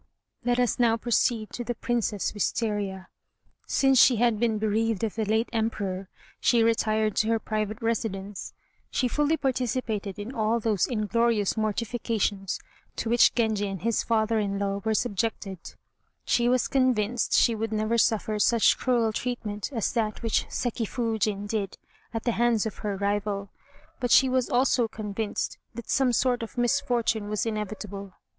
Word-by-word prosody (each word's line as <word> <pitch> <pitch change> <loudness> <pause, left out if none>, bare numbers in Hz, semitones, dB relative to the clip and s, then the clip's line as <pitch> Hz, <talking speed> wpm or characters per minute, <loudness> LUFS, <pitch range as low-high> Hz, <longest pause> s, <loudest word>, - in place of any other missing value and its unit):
Let 245 0 +1
us 245 -1 +1
now 230 -2 +4
proceed 230 -1 0
to 240 - -5
the 240 0 -3
Princess 230 -5 -1
Wistaria. 205 -2 -2 0.6
Since 270 -2 +4
she 255 - +6
had 230 -1 +2
been 225 -2 +1
bereaved 220 0 0
of 220 - -1
the 220 -1 -2
late 220 +3 +1
Emperor 200 -4 -2 0.3
she 235 -2 +3
retired 220 -2 +1
to 215 - +2
her 225 0 +2
private 215 -1 -3
residence. 205 -3 -3 0.3
She 255 - 0
fully 295 +5 +1
participated 245 -7 -2
in 210 +5 -6
all 225 0 +1
those 215 -4 +1
inglorious 225 -2 +1
mortifications 215 -2 -1 0.4
to 225 - -2
which 240 - +5
Genji 220 -3 +1
and 195 -2 -6
his 230 -1 +1
father 225 -1 +1
in 200 -1 -1
law 200 0 -2
were 220 -1 +1
subjected. 205 -5 -3 0.5
She 240 0 +2
was 255 0 +2
convinced 245 -3 +1
she 235 - +5
would 225 0 -3
never 215 +2 +1
suffer 215 -1 +1
such 230 +1 +4
cruel 235 -3 +1
treatment 215 -2 -3
as 225 -7 -1
that 220 -1 -1
which 230 - +1
Seki 235 -2 -2
Foojin 215 -4 -1
did 205 -2 -3 0.3
at 225 -1 -4
the 240 - +1
hands 230 -1 +2
of 220 - -4
her 205 -2 -3
rival, 200 0 -2 0.5
but 245 - -1
she 265 - +6
was 255 -1 +1
also 245 -1 +3
convinced 215 -1 -4 0.2
that 235 - -6
some 265 -3 +3
sort 245 0 +1
of 230 +2 -7
misfortune 240 -4 +1
was 210 -1 -1
inevitable. 210 -3 -5
220 Hz, 160 wpm, -27 LUFS, 210-235 Hz, 0.6 s, she